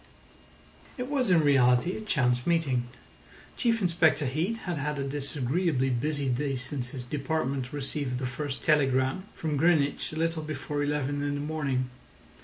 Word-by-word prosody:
It 250 0 -4
was 260 -6 +1
in 175 -3 +5
reality 130 +3 +4
a - - -5
chance 125 - +1
meeting. 140 -8 +1 0.7
Chief 230 -3 +1
Inspector 165 -4 +3
Heat 160 - -1
had 175 -4 -2
had 150 +1 -2
a 140 - -1
disagreeably 135 +1 0
busy 145 +3 -1
day 135 +2 0
since 125 0 -4
his 125 -1 -6
department 135 -1 -2
received 140 -2 -3
the 130 - -3
first 135 +2 -4
telegram 135 +3 +2
from 155 -3 -2
Greenwich 150 -2 +2
a - - -7
little 165 0 0
before 150 -1 -3
eleven 145 -1 -1
in 145 0 -1
the - - -3
morning. 145 -4 -1
145 Hz, 155 wpm, -28 LUFS, 130-160 Hz, 0.7 s, in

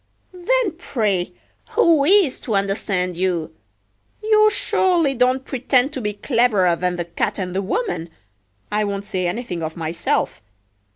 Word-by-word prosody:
Then 445 +4 0
pray 205 - -1 0.4
who 335 -11 +4
is 370 -6 +4
to 225 - -3
understand 195 -2 -1
you? 175 -3 -1 0.7
You 430 0 +5
surely 350 -7 +2
don't 255 +1 +1
pretend 260 +1 +1
to 265 - -3
be 210 -1 -2
cleverer 210 -6 +2
than 180 +1 -1
the 175 -1 -3
Cat 170 +4 -2
and 185 -2 -4
the 195 - +1
woman—I 160 - -5
won't 200 -1 -3
say 185 -4 -2
anything 180 -3 -4
of 160 +1 -5
myself. 165 0 -2
210 Hz, 135 wpm, -21 LUFS, 180-275 Hz, 0.7 s, You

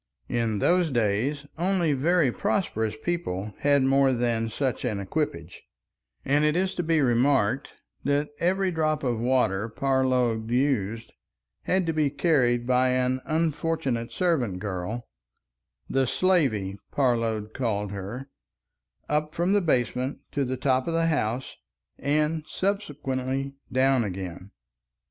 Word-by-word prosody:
In 115 -3 0
those 175 - +3
days 120 +5 0
only 175 -3 +2
very 150 0 +2
prosperous 110 - -1
people 110 - -3
had 140 -1 +3
more 135 0 +4
than 115 -2 0
such 130 +3 -2
an 110 -5 -1
equipage, 95 - -3 0.6
and 145 +2 +3
it 150 0 +2
is 185 +1 +1
to - - -2
be 165 -2 +2
remarked 125 -1 +2 0.3
that 145 +1 +1
every 190 +2 +1
drop 155 -2 0
of 120 -4 0
water 115 -4 +1
Parload 125 -3 +1
used 115 -4 0 0.5
had 185 0 +1
to 165 - 0
be 155 -2 +2
carried 130 -6 +2
by 130 +1 +3
an 130 0 +1
unfortunate 155 -6 -1
servant 145 - 0
girl,—the 65 - -5
"slavey," 120 - +1
Parload 115 -5 0
called 105 -5 -2
her—up 95 - -6
from 175 +3 +1
the 205 - +4
basement 130 -3 0
to 140 - 0
the 130 0 -2
top 130 0 +1
of 165 - -1
the 165 0 +2
house 125 -4 -1 0.4
and 150 +2 +1
subsequently 135 -8 -2 0.2
down 130 -1 +3
again. 95 -2 -6
130 Hz, 125 wpm, -26 LUFS, 110-150 Hz, 0.6 s, more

